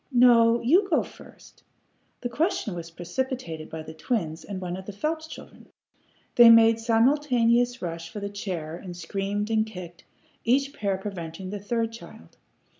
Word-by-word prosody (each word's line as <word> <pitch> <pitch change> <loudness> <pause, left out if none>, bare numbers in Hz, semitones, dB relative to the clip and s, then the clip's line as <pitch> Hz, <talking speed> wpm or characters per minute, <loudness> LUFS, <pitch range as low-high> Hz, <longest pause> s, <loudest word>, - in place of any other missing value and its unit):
No! 235 -2 +5
You 355 - +4
go 320 - +3
first!" - - -16 0.6
The 245 - -3
question 325 - -1
was 170 -1 -7
precipitated 175 - -4
by 160 -1 -6
the 160 - -9
twins 160 -3 -3
and 200 -2 -6
one 180 -1 -4
of 190 0 -9
the - - -4
Phelps 315 +10 -3
children. - - -12 0.7
They 240 -1 +10
made 230 0 +7
simultaneous 240 0 +2
rush 165 -1 -5
for 210 - -7
the 200 - -4
chair, 180 -6 -5
and 175 0 -9
screamed 205 +3 -3
and 220 -1 +3
kicked, 180 -6 -10 0.4
each 275 +4 +2
pair 200 -7 -1
preventing 185 -2 -6
the 205 - -4
third 225 +3 -1
child. 170 - -13
210 Hz, 160 wpm, -26 LUFS, 175-240 Hz, 0.7 s, They